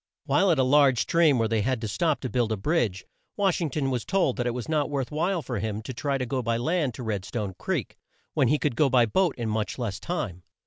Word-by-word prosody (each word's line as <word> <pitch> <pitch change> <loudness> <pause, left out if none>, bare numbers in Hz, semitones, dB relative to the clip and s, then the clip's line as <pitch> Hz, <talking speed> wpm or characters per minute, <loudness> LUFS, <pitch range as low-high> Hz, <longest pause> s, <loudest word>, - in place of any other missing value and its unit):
While 195 - +3
at 165 - +3
a 130 - +4
large 135 -1 +5
stream 165 -3 +3
where 115 -1 +2
they 110 -1 +1
had 130 +3 0
to 110 - -2
stop 155 - 0
to 130 - -3
build 120 -3 +1
a 110 - 0
bridge, 105 - 0 0.3
Wash 195 -3 +1
ing 165 - 0
ton 135 -1 -1
was 125 -3 -1
told 185 -9 +1
that 120 - -1
it 120 - 0
was 125 - -5
not 155 -2 0
worth 140 -2 -2
while 170 +3 0
for 120 -4 -3
him 110 +1 -3
to 130 - -6
try 140 +3 -1
to 130 - -2
go 130 +1 -2
by 115 -1 0
land 145 -1 0
to 125 - -7
Red 105 -4 -2
stone 105 -3 -4
Creek, - - -3 0.4
when 140 -5 +3
he 150 - +3
could 145 -4 -1
go 140 +3 +3
by 125 -2 +4
boat 175 - +1
in 120 -2 -3
much 110 -1 -2
less 115 -6 -3
time. 150 - -4
130 Hz, 265 wpm, -26 LUFS, 115-155 Hz, 0.4 s, large